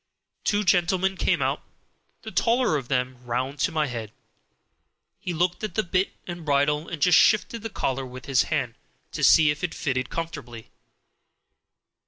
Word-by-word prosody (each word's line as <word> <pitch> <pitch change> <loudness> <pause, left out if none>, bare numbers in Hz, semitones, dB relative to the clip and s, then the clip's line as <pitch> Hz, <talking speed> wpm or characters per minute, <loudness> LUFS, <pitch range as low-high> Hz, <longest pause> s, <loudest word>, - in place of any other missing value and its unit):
Two 205 0 +1
gentlemen 185 0 +2
came - - +1
out; - - -1 0.6
the - - -7
taller 240 -6 +2
of 135 -5 -3
them 125 -1 -1
came 125 - -23
round 130 +4 -2
to - - +1
my 155 -1 +1
head; 115 -5 -5 1.1
he 180 - -4
looked 175 +4 -1
at 210 -5 -4
the 215 - +1
bit 185 +2 0
and 175 -1 -7
bridle, 150 +2 +1
and 165 - -5
just 180 -2 +6
shifted 225 +1 +3
the 225 - -5
collar 135 - -2
with 130 0 -10
his 135 -3 +3
hand, 135 -7 -1 0.4
to - - -4
see 155 -2 +6
if 150 +2 -6
it 175 - -2
fitted 130 -2 -2
comfortably. 140 -9 -6
155 Hz, 170 wpm, -25 LUFS, 130-180 Hz, 1.1 s, just